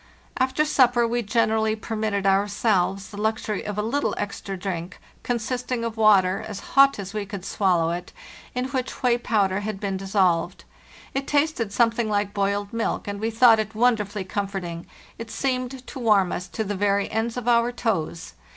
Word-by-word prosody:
After 260 +3 +1
supper 245 -5 +3
we 240 +1 0
generally 220 0 +1
permitted 215 -2 -2
ourselves 195 0 +1
the 205 0 -6
luxury 220 -2 -1
of 210 -1 -5
a 210 - 0
little 280 +6 0
extra 200 -1 -4
drink, 180 -1 -5 0.2
consisting 245 0 -2
of 230 -1 -3
water, 200 -4 +4
as 210 -3 -6
hot 275 0 +6
as 200 0 -6
we 210 -1 -2
could 200 -2 -7
swallow 175 -5 +1
it, 175 +1 -5 0.4
in 250 0 -1
which 260 -1 -4
whey 245 -1 +3
powder 200 -5 +1
had 205 -1 -4
been 195 -2 -2
dissolved. 190 -3 +1 0.5
It 270 0 -2
tasted 290 -7 +1
some 230 +1 +3
thing 225 -1 -2
like 205 -1 0
boiled 200 +1 -1
milk, 230 -2 -2
and 200 0 -4
we 220 +2 -1
thought 230 0 +6
it 215 0 -3
wonderfully 215 -4 +1
comforting; 190 -3 -4 0.3
it 230 0 -7
seemed 255 0 -2
to 270 - -8
warm 210 -6 +3
us 180 - -4
to 220 - -3
the 205 0 -3
very 200 0 +1
ends 225 +2 -1
of 245 -1 -4
our 235 0 +3
toes. 195 -9 -2
215 Hz, 180 wpm, -24 LUFS, 195-235 Hz, 0.5 s, hot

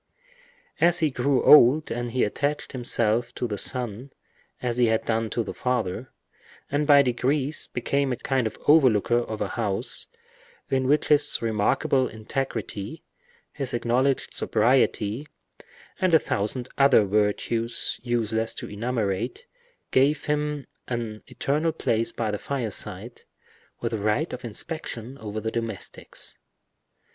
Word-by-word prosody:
As 170 0 +5
he 155 -3 +2
grew 130 +1 +1
old 150 +1 +7
he 120 +1 -1
attached 145 +8 -1
himself 120 -1 0
to 120 - -2
the 105 -3 -3
son 125 0 -2 0.5
as 125 -1 -2
he 120 - +5
had 110 0 +1
done 115 -1 0
to 115 - -1
the - - -6
father, 120 -1 -2 0.6
and 145 +1 0
by 140 -2 +7
degrees 135 +4 0
became 140 +2 -1
a - - 0
kind 130 -2 0
of 110 - -7
over 145 -3 +7
looker 115 +2 +2
of 110 -3 -5
a 100 - -1
house 110 +1 -3 0.6
in 130 -1 +1
which 150 +2 +2
his 150 -1 +4
remarkable 115 +4 +1
integrity, 110 +1 -5 0.5
his 135 -4 -3
acknowledged 125 +3 +1
sobriety, 115 +1 +1 0.7
and 185 -3 +4
a - - +7
thousand 120 +2 -2
other 135 -6 +6
virtues 105 +3 0
useless 115 -2 -1
to - - -6
enumerate, 105 -3 -2 0.5
gave 145 +3 +3
him 150 -2 -1 0.2
an 115 -3 -4
eternal 155 +4 0
place 115 -7 0
by 110 -2 -2
the 105 - -3
fireside, 125 -7 -4 0.6
with - - -2
a 110 - -1
right 105 +11 0
of 125 - -6
inspection 125 0 -4
over 110 0 -5
the 110 +1 -3
domestics. 115 -5 -4
120 Hz, 135 wpm, -25 LUFS, 110-140 Hz, 0.7 s, old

